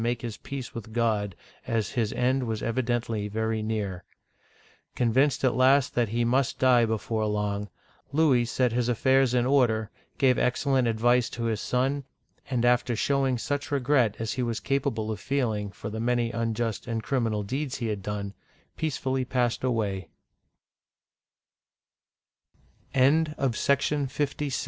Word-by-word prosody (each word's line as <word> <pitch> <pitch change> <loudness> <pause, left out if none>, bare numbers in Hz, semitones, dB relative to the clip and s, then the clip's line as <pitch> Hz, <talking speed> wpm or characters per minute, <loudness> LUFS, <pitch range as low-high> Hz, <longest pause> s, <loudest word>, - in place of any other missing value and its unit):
make 120 0 -1
his 115 -3 -5
peace 135 -3 -7
with 110 -1 -8
God, 110 -5 0 0.3
as 115 -2 -1
his 115 -3 0
end 130 0 +1
was 110 -1 -3
evidently 115 -3 -1
very 110 +1 -1
near. 105 -4 -3 0.9
Convinced 130 +4 +2
at 130 - +3
last 130 +1 +4
that 120 -3 +1
he 120 +2 0
must 130 +2 +1
die 125 -2 +5
before 110 0 -1
long, 105 -1 -2 0.4
Louis 140 -5 +3
set 125 +1 +1
his 120 +1 0
affairs 130 +1 +3
in 120 -1 +2
order, 120 -5 +2 0.3
gave 130 -2 +3
excellent 130 0 +1
advice 120 +2 +2
to 115 - -5
his 110 -2 -1
son, 135 +3 0 0.5
and 125 -3 +1
after 120 0 +2
showing 135 +1 +1
such 145 +4 -3
regret 130 -5 +2
as 110 -1 -3
he 130 - -2
was 120 -2 -1
capable 130 -6 -1
of 105 - -4
feeling 110 -6 -1
for 105 +3 -7
the 110 - -4
many 120 0 +1
unjust 115 -1 -2
and 115 -2 -2
criminal 115 -6 0
deeds 135 +6 -3
he 120 - -4
had 105 -3 -2
done, 100 0 -4 0.4
pe 160 - 0
120 Hz, 135 wpm, -27 LUFS, 110-130 Hz, 0.9 s, die